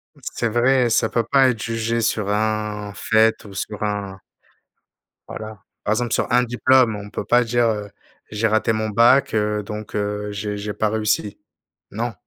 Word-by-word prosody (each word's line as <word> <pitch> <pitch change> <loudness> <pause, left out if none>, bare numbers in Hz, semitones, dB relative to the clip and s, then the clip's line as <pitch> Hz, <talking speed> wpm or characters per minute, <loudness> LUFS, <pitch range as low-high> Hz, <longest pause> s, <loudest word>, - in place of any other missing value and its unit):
Mmh, - - -21
c'est 115 - -1
vrai, 125 +2 +3
ça - - +2
peut 115 - 0
pas 135 +2 +4
être 115 - -2
jugé 115 0 -1
sur 110 -3 0
un 105 -1 -1
fait, 110 +1 +2
ou 100 - -11
sur 105 +2 -5
un 100 -2 -3 1.1
Voilà, 110 -1 -8 0.3
par 110 - +2
exemple 120 +1 -1
sur - - 0
un 125 - +4
diplôme, 125 -1 +3
on 100 0 -9
peut 105 - -4
pas 120 +4 +4
dire, 120 +1 +1
heu: 105 -2 -3 0.4
«J'ai 110 +1 +1
raté 110 +1 +1
mon 110 0 -2
bac, 120 +5 +4
heu, 105 -1 0
donc 105 +1 -7
heu, 105 0 -2
j'ai 105 0 -4
j'ai 105 0 -4
pas 110 - 0
réussi». 105 -1 -1 0.5
Non. 115 +3 -3
110 Hz, 180 wpm, -21 LUFS, 105-115 Hz, 1.1 s, pas